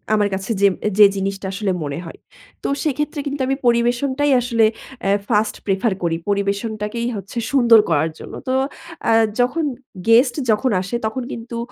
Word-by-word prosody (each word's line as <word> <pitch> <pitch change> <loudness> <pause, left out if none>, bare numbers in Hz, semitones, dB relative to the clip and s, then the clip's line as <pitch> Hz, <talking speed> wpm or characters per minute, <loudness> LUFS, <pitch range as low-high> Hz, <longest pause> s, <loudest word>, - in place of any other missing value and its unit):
আমার 205 -1 +2
কাছে 195 +4 -3
যে 200 - +7 0.3
যে 205 - +11
জিনিসটা 195 0 -3
আসলে 195 -1 -1
মনে 145 +2 -4
হয়। 165 - -10 0.4
তো - - -1 0.2
সেক্ষেত্রে 295 0 -2
কিন্তু 280 0 -3
আমি 270 - +1
পরিবেশনটাই 245 +4 +2
আসলে 230 -2 +2 0.4
এ - - +4 0.2
ফার্স্ট 215 -1 +1
প্রেফার 195 +2 +1
করি। 165 -1 +1
পরিবেশনটাকেই 210 +3 -1
হচ্ছে 200 +4 -8
সুন্দর 235 -5 +6
করার 160 0 +2
জন্য। - - -10
তো 255 - 0 0.6
আ - - +4 0.3
যখন 255 +7 +1 0.4
গেস্ট 240 +2 +5 0.2
যখন 240 +3 +1
আসে 195 +6 -4
তখন 240 +3 -2
কিন্তু 235 0 -6
225 Hz, 160 wpm, -20 LUFS, 200-245 Hz, 0.6 s, যে